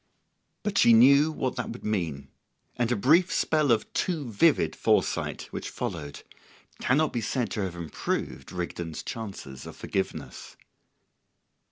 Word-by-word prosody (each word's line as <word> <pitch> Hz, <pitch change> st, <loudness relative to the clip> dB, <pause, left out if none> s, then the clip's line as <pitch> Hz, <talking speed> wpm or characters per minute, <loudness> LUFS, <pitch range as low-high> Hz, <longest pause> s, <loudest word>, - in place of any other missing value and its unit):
But 205 Hz, -1 st, 0 dB
she 120 Hz, -, +7 dB
knew 140 Hz, +7 st, +6 dB
what 130 Hz, -4 st, -3 dB
that -, -, -3 dB
would 120 Hz, -, -8 dB
mean, 80 Hz, -10 st, -2 dB, 0.5 s
and 120 Hz, 0 st, 0 dB
a -, -, +3 dB
brief 160 Hz, -, +4 dB
spell 155 Hz, -4 st, +2 dB
of 110 Hz, -2 st, +1 dB
too 155 Hz, -9 st, -1 dB
vivid 100 Hz, -, +3 dB
foresight, -, -, +1 dB
which -, -, -5 dB
followed, 75 Hz, -1 st, -5 dB, 0.6 s
cannot 150 Hz, +4 st, +2 dB
be 120 Hz, -, -1 dB
said 120 Hz, +3 st, -1 dB
to 105 Hz, -, -2 dB
have 95 Hz, -3 st, -3 dB
improved 80 Hz, -4 st, -4 dB
Rigden's 85 Hz, -2 st, -5 dB
chances 95 Hz, -, -7 dB
of -, -, -9 dB
forgiveness. 95 Hz, -, -4 dB
115 Hz, 140 wpm, -27 LUFS, 85-140 Hz, 0.6 s, she